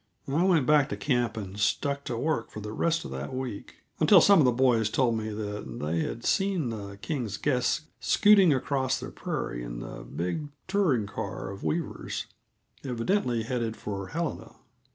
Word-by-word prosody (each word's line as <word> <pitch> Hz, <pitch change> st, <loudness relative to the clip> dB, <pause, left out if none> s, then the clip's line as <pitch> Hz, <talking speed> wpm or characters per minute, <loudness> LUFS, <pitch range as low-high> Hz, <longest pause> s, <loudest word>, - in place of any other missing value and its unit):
I 150 Hz, +6 st, +1 dB
went 170 Hz, -8 st, +4 dB
back 150 Hz, 0 st, +4 dB
to -, -, -3 dB
camp 120 Hz, -5 st, 0 dB
and 100 Hz, -1 st, -6 dB
stuck 140 Hz, +7 st, 0 dB
to 120 Hz, -, -3 dB
work 145 Hz, -2 st, -1 dB
for -, -, -8 dB
the 105 Hz, 0 st, -6 dB
rest 165 Hz, +7 st, 0 dB
of -, -, -7 dB
that 65 Hz, -, -5 dB
week 130 Hz, -6 st, -5 dB, 0.2 s
until -, -, +7 dB
some 200 Hz, -2 st, +6 dB
of 150 Hz, -, +5 dB
the 125 Hz, -, +5 dB
boys 120 Hz, -3 st, +3 dB
told 120 Hz, 0 st, +2 dB
me 110 Hz, 0 st, -3 dB
that 105 Hz, -, -5 dB
they 80 Hz, +3 st, -1 dB
had 115 Hz, +8 st, -3 dB
seen 190 Hz, -9 st, +1 dB
the 100 Hz, -2 st, -7 dB
Kings' 120 Hz, -10 st, -2 dB
guests 125 Hz, 0 st, +1 dB, 0.2 s
scooting 200 Hz, -5 st, +5 dB
across 135 Hz, -1 st, 0 dB
the -, -, -7 dB
prairie -, -, -4 dB
in -, -, -6 dB
the -, -, -7 dB
big 90 Hz, -, -3 dB, 0.2 s
touring 185 Hz, -, +2 dB
car 95 Hz, 0 st, -5 dB
of 100 Hz, -, -9 dB
Weaver's, 165 Hz, -2 st, -2 dB, 0.6 s
evidently 125 Hz, -, 0 dB
headed 115 Hz, -2 st, -2 dB
for 100 Hz, -2 st, -5 dB
Helena. 165 Hz, -, -4 dB
120 Hz, 175 wpm, -28 LUFS, 105-150 Hz, 0.6 s, until